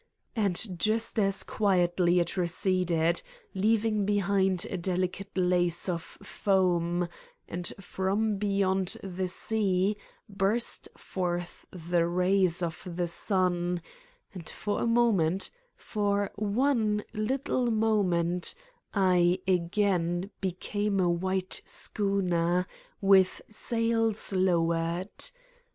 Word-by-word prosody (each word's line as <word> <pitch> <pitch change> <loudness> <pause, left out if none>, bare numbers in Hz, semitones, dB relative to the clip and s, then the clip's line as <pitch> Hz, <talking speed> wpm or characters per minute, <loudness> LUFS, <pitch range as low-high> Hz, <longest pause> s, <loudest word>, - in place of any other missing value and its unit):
And 195 -3 0
just 220 +2 +1
as 195 -2 +2
quietly 180 -3 +2
it 170 +1 -1
receded, 175 -2 +1 0.3
leaving 215 +1 +2
behind 195 -2 +1
a - - -2
delicate 185 +2 -2
lace 180 -1 +2
of 170 -2 -1
foam, 175 -2 0 0.4
and 175 0 -3
from 195 +3 -1
beyond 195 -2 0
the 190 -1 -3
sea 200 0 +1 0.3
burst 200 +4 -1
forth 175 -2 -4
the 170 -1 0
rays 180 0 +2
of 165 -1 -3
the 175 0 0
sun, 180 -1 0 0.5
and 180 -5 -8
for 205 - -3
a - - +1
moment, 200 -7 +2 0.2
for 205 -2 -1
one, 215 0 +1
little 250 +2 0
moment, 185 -6 +1 0.4
I 180 -2 +4
again 180 0 +1
became 200 +2 -1
a 175 -2 +3
white 185 +2 -2
schooner, 180 -3 0 0.4
with 195 -2 +5
sails 225 -1 0
lowered. 170 - 0
190 Hz, 100 wpm, -29 LUFS, 175-205 Hz, 0.5 s, with